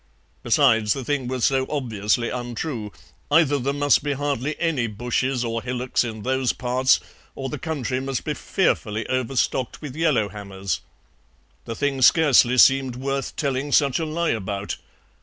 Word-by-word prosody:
Besides, 115 -4 +3
the 135 -3 -6
thing 140 -2 -1
was 130 -1 0
so 135 -1 +1
obviously 120 -4 -1
untrue; 120 -2 -4 0.4
either 145 -2 +4
there 135 +2 -1
must 145 0 +3
be 145 0 -1
hardly 145 0 -2
any 155 -8 0
bushes 125 +3 -1
or 115 0 -2
hillocks 125 +1 -1
in 110 -3 -6
those 130 -1 0
parts 130 +1 +2 0.4
or 135 -1 -4
the - - -5
country 140 -6 -2
must 135 -2 -3
be - - -2
fearfully 105 +1 -1
overstocked 130 0 -1
with 145 -4 -8
yellow 150 -10 +2
hammers. 100 -4 -5 0.8
The 115 - -5
thing 140 -1 -1
scarcely 130 -3 +5
seemed 135 -1 +5
worth 135 +1 -3
telling 140 -1 -2
such 140 0 +3
a 165 - -1
lie 165 +2 0
about. 100 -2 -3
130 Hz, 155 wpm, -23 LUFS, 115-140 Hz, 0.8 s, scarcely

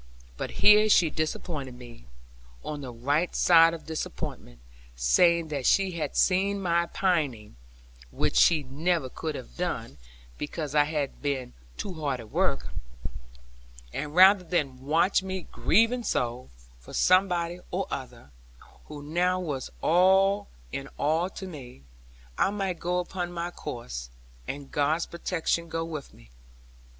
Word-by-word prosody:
But - - -4 0.2
here 210 +1 +8
she 170 -6 +5
disappointed 155 -4 -3
me, 120 - -13 0.6
on 150 -1 -4
the 130 -3 -6
right 145 +9 0
side 165 -1 +6
of 165 - -11
disappointment; 155 - -6 0.4
saying 165 - +3
that 140 -4 -2
she 195 -1 +3
had 155 -5 -4
seen 195 +2 +2
my 170 -2 +1
pining 145 - -1 0.5
(which - - -1
she 160 -4 +5
never 145 +2 -1
could 155 +3 -4
have - - -9
done; 70 - -3 0.4
because 150 -1 -4
I 145 -1 +5
had 150 -2 -3
been 135 -4 -2 0.2
too 195 - -4
hard 145 -6 -2
at 110 -2 -11
work), - - 0 1.2
and 150 +1 -4
rather 190 +1 +7
than 150 -7 -1
watch 165 +8 +3
me 190 -1 -5
grieving 230 +5 +3
so, 125 - -2 0.3
for - - -13
somebody 180 -2 +2
or 190 +2 -1
other, 125 - -7 0.5
who 150 -1 -9
now 180 +4 +1
was 145 -8 -4
all 190 +4 +4 0.2
in 135 0 -5
all 160 +5 +1
to 190 - -8
me, 130 - -10 0.6
I - - +4
might 195 -4 -2
go 180 +1 -1
upon 180 0 -3
my 175 0 -4
course, 65 - -6 0.4
and 140 0 -6
God's 150 +3 +1
protection 170 -1 -2
go 165 0 -2
with 155 -4 -7
me! - - -19
160 Hz, 140 wpm, -27 LUFS, 135-180 Hz, 1.2 s, here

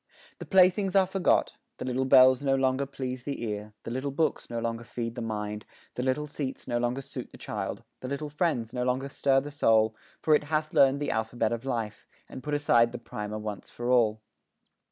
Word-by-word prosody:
The - - -8
playthings 190 +1 +4
are 195 -1 +6
forgot; 190 0 +1 0.2
The - - -5
little 130 +1 0
bells 130 0 +6
no 135 -1 +3
longer 135 +1 +1
please 130 -2 -5
the 140 -2 -5
ear, 105 -1 -4
The 115 - -6
little 130 +3 -2
books 155 +3 -1
no 120 - -4
longer 115 0 -2
feed 115 -1 -4
the - - -6
mind, 105 -2 -4 0.3
The - - -3
little 130 +3 0
seats 145 -2 -5
no 120 - 0
longer 120 +3 -1
suit - - -6
the - - -12
child, - - -4 0.2
The 130 - -6
little 140 +2 -4
friends 145 -8 -1
no 125 - -2
longer 130 +2 -1
stir 135 0 +2
the 145 +2 -7
soul, 110 -6 +3 0.2
For 155 - +3
it 150 - +3
hath 155 0 -1
learned 135 +1 +5
the 145 - 0
alphabet 110 0 -1
of 115 +2 -3
life, 115 -5 -3 0.2
And 130 - -9
put 150 +3 -2
aside 120 -5 +3
the - - -3
primer 105 -2 -6
once 105 -1 -6
for 120 +1 -3
all. 110 -3 +3
130 Hz, 210 wpm, -28 LUFS, 115-140 Hz, 0.3 s, are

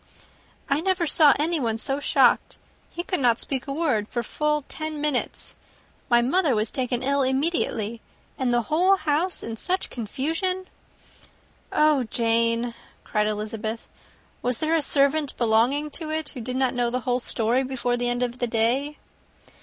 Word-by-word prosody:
"I 280 +2 +1
never 375 -1 +1
saw 300 -2 +6
anyone 290 -8 0
so 270 +4 -1
shocked. - - +2 0.3
He 345 - -5
could 365 -1 -2
not 240 -3 +3
speak 270 0 -3
a - - -3
word 275 -9 0
for 240 0 -3
full 300 +4 -1
ten 310 -1 -5
minutes. 290 -4 -2 0.5
My 240 -1 +4
mother 290 +1 +2
was 215 0 0
taken 250 -1 -2
ill 280 +1 +1
immediately, 260 -5 -1 0.3
and 255 -2 -1
the 240 -1 +2
whole 360 - +3
house 320 +2 -1
in 225 0 -5
such 370 +9 -2
confusion!" 325 - -2 1.1
"Oh, 300 -2 +3
Jane," 230 +1 +1 0.3
cried 210 -1 0
Elizabeth, 215 +1 -4 0.6
"was 245 -1 0
there 315 +1 0
a 325 - +2
servant 285 +1 +1
belonging 245 +6 +2
to 315 +1 -5
it 310 -1 -2
who 255 - -8
did 250 +2 -4
not 260 -1 +1
know 245 -1 0
the 250 +1 -2
whole 250 0 0
story 235 +1 +1
before 255 -2 -1
the 245 0 -1
end 245 +1 0
of 245 0 -3
the 245 - 0
day?" 240 +6 0
260 Hz, 160 wpm, -24 LUFS, 235-300 Hz, 1.1 s, saw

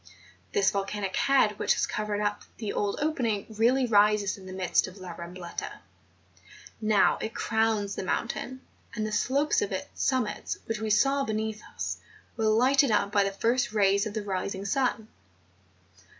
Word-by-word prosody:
This 410 -2 +3
volcanic 200 -1 -3
head 240 -4 +3
which - - +2
has - - +1
covered 210 -1 -2
up 205 0 -1 0.2
the 215 -3 -4
old 205 -1 -1
opening 235 -10 0
really 250 +4 +3
rises 210 -2 +3
in 190 -2 -12
the - - -7
midst 185 -1 +1
of 185 +2 -11
La 185 -2 -8
Rambleta; 170 +1 -7 1.1
now 215 -2 +3
it 220 - -4
crowns 220 -3 0
the - - -4
mountain, 240 +6 -3 0.3
and 215 -2 -1
the 215 - -3
slopes 285 - +1
of 430 - -2
its - - -4
summit 245 -6 -1
which 225 -1 -3
we 220 0 -2
saw 275 +7 +3
beneath 220 -1 -3
us, - - -3 0.4
were 225 - -1
lighted 255 +5 +4
up 200 -2 +2
by 205 -1 +4
the 195 - -1
first 230 +3 0
rays 200 0 +3
of 210 - -7
the 215 - -2
rising 195 0 -3
sun. 230 0 0
215 Hz, 165 wpm, -28 LUFS, 200-240 Hz, 1.1 s, lighted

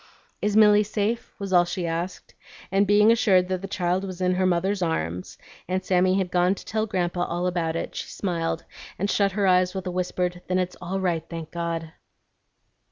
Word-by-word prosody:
"Is 210 0 +1
Milly 210 -1 +7
safe?" 215 +2 -2
was 195 -2 -4
all 175 -1 +7
she 175 0 -3
asked, 170 +2 -4 0.4
and 195 +1 +3
being 210 +2 +6
assured 190 -6 +3
that 185 -1 -1
the 195 - -5
child 185 -1 -1
was 185 -2 -6
in 180 0 +2
her 185 0 +2
mother's 185 +3 0
arms, 90 - -2 0.3
and 185 +1 -2
Sammy 185 0 +3
had 185 -2 -1
gone 180 +2 +3
to - - -12
tell 220 0 -1
Grandpa 175 -2 -1
all 175 +1 -2
about 170 -3 -1
it, - - -4
she - - -4
smiled 165 -4 -2 0.3
and 200 +2 0
shut 200 -2 +2
her 200 0 +1
eyes 180 0 +3
with 190 - -4
a 180 - -2
whispered, 180 0 -2
"Then 185 - +1
it's 180 -1 -1
all 185 +2 -3
right, 175 -4 0
thank 165 -2 -7
God!" 165 -1 -3
180 Hz, 200 wpm, -25 LUFS, 175-195 Hz, 0.4 s, Milly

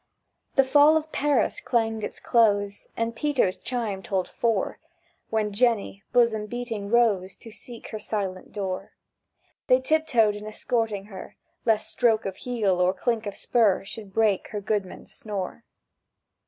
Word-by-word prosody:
The 270 - +6
"Fall 290 +4 +6
of 315 0 -4
Paris" 280 -6 +1
clanged 225 -3 0
its - - -5
close, 205 -3 +2
And 230 0 -1
Peter's 260 -8 +1
chime 230 -6 -3
told 190 -2 -1
four, 230 -2 -1 0.5
When 215 -2 0
Jenny, 220 -3 +1
bosom 225 -3 +3
beating, 230 -3 -4
rose 205 -6 +2
To 225 - -12
seek 235 +2 -9
her 215 - -5
silent 195 -3 -4
door. 190 -3 -4 0.7
They 255 - +5
tiptoed 260 -7 +2
in 210 +1 -7
escorting 215 -2 -1
her, 190 - -9 0.3
Lest 220 -2 +2
stroke 225 -3 +2
of 195 -1 -4
heel 210 -7 0
or 180 +1 +3
clink 230 -2 -1
of 200 - -5
spur 215 -6 +2
Should 205 -1 -8
break 210 -2 +2
her 210 - -4
goodman's 200 -2 -3
snore. 205 +1 -5
220 Hz, 145 wpm, -26 LUFS, 200-240 Hz, 0.7 s, The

